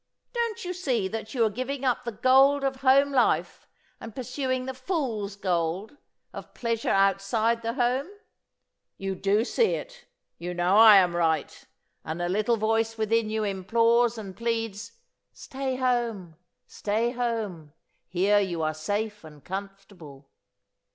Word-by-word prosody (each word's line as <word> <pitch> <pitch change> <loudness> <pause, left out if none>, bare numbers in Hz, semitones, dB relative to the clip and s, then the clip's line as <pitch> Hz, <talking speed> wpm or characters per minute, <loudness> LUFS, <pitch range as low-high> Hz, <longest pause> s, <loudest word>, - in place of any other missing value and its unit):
Don't 465 -5 -2
you 360 - -3
see 255 - -1
that 220 +3 -6
you 235 -3 +3
are - - +2
giving 255 +4 -4
up 250 -1 0
the 235 - -2
gold 265 +5 +4
of 270 -1 -1
home 275 +1 +4
life 260 -3 +1 0.3
and 225 - -10
pursuing 255 0 -2
the 265 - -4
fool's 255 - -3
gold 185 - -2 0.4
of - - -10
pleasure 230 -1 -2
outside 195 +4 +2
the 230 0 -2
home? 255 +3 0 0.9
You 195 0 -3
do 200 +4 +1
see 455 - +1
it, - - -9 0.3
you 175 +1 -5
know 175 +2 +2
I 220 -1 +9
am 180 -3 +4
right, 160 -3 -1 0.4
and 160 +3 -5
a 175 - -1
little 215 +5 +1
voice 225 +1 0
within 220 0 +1
you 220 0 -1
implores 230 +4 +2
and 195 -4 -8
pleads: 230 -1 -3 0.4
'Stay 265 -1 -4
home! 235 -9 -1 0.3
Stay 220 +3 -1
home! 220 - -3 0.3
here 195 +4 +2
you 175 -5 -2
are 155 0 0
safe 205 +6 -3
and 150 -2 -14
comfortable! 190 -7 -9
225 Hz, 145 wpm, -26 LUFS, 195-250 Hz, 0.9 s, I